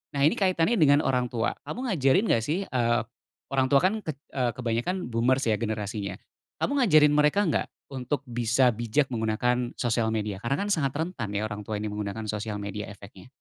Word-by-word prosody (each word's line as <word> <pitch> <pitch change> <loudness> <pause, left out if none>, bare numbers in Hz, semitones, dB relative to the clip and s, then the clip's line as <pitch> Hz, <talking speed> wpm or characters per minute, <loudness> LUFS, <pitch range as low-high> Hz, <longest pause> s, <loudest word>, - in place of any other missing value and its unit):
Nah 140 - +1
ini 150 - +3
kaitannya 190 +3 +2
dengan 145 -1 +5
orang 125 -1 +1
tua. 115 -1 -1 0.2
Kamu 250 0 -3
ngajarin 150 +2 +3
enggak 115 - +2
sih, 165 +10 -1
eee, 120 - +1 0.5
orang 135 -1 +2
tua 140 +1 +5
kan 205 +4 +2
eee, 135 -4 -2
kebanyakan 125 +8 -2
boomers 125 +4 +2
ya 110 -3 +1
generasinya. 105 -3 -3 0.5
Kamu 280 0 +1
ngajarin 155 - +6
mereka 150 +7 +3
enggak 165 - 0 0.2
untuk 135 +1 -3
bisa 120 0 +2
bijak 120 +5 0
menggunakan 120 +2 0
sosial 115 -2 0
media? 105 -3 -2
Karena 135 - -1
kan 205 - -3
sangat 140 -7 0
rentan 145 - -3
ya 105 - 0
orang 105 -1 -5
tua 110 - -2
ini 105 0 -3
menggunakan 105 +1 -4
sosial 105 0 -4
media 105 +1 -5
efeknya. 100 -2 -12
125 Hz, 185 wpm, -27 LUFS, 110-150 Hz, 0.5 s, ngajarin